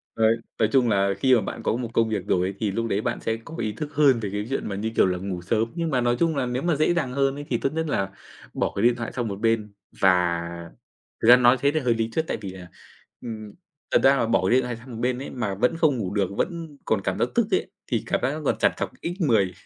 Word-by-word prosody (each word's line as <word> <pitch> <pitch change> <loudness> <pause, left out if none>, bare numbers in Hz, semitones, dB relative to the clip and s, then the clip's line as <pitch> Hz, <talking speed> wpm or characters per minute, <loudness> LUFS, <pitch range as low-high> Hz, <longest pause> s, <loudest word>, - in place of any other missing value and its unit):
Đấy, 115 +1 +3 0.2
nói 110 -1 +3
chung 125 -3 +3
là 100 -1 +2
khi 130 +4 +4
mà 115 - +2
bạn - - -6
có - - +1
một 120 -1 -3
công 115 -1 +2
việc 110 - -2
rồi 90 0 +2
ấy 100 - -4
thì 105 -3 0
lúc 115 +3 -2
đấy 105 0 0
bạn - - -2
sẽ 115 0 -1
có 165 - -9
ý 110 -2 -1
thức 145 +8 -6
hơn 140 -5 +4
về 105 -3 -3
cái 105 +1 -3
chuyện 135 - -2
mà, 100 - -3
như 110 +3 -2
kiểu - - +5
là, 90 -1 0
ngủ 90 -1 -4
sớm, 110 +5 0
nhưng 170 -2 -1
mà 130 -3 +1
nói 120 0 +2
chung 165 -2 +2
là 130 - 0
nếu 125 +2 -2
mà 170 -2 +2
dễ 155 +4 +2
dàng 140 -7 -1
hơn 135 0 +1
ấy 145 0 -7
thì 120 - +1
tốt 135 - -2
nhất 160 0 -1
là 95 -8 -1 0.4
bỏ - - -1
cái 100 - -1
điện 120 0 +5
thoại 115 -1 -5
sang 120 -3 -3
một 100 -1 -5
bên 110 -2 +1 0.3
và 90 -3 +3 0.8
thực 115 - +2
ra 125 - +10
nói 125 +1 +5
thế 140 +1 +3
thì 155 +1 0
hơi 120 -3 +2
lý 115 0 -1
thuyết 160 - 0
tại - - -1
vì 100 - -6
là, 90 -2 -10 0.5
ừm, 110 -3 -7 0.4
thật - - +4
ra 135 +1 +6
là 115 - +1
bỏ 105 -5 +2
điện 130 +2 +4
thoại 120 -1 -4
sang 125 +3 -13
một 115 - -7
bên 125 +1 0
ấy 135 - -6
mà 110 -6 -3
vẫn 125 - +1
không 155 -6 +2
ngủ 100 -2 -3
được, 100 -3 +1
vẫn 165 -4 -3
còn 110 - +1
cảm - - -1
giác - - +1
tức - - +3
ấy, - - 0 0.2
thì - - -1
cảm - - 0
giác 130 - +1
nó 155 - -5
còn - - +1
trằn - - +3
trọc - - -3
x10, 130 - +1
115 Hz, 290 wpm, -24 LUFS, 105-135 Hz, 0.8 s, ra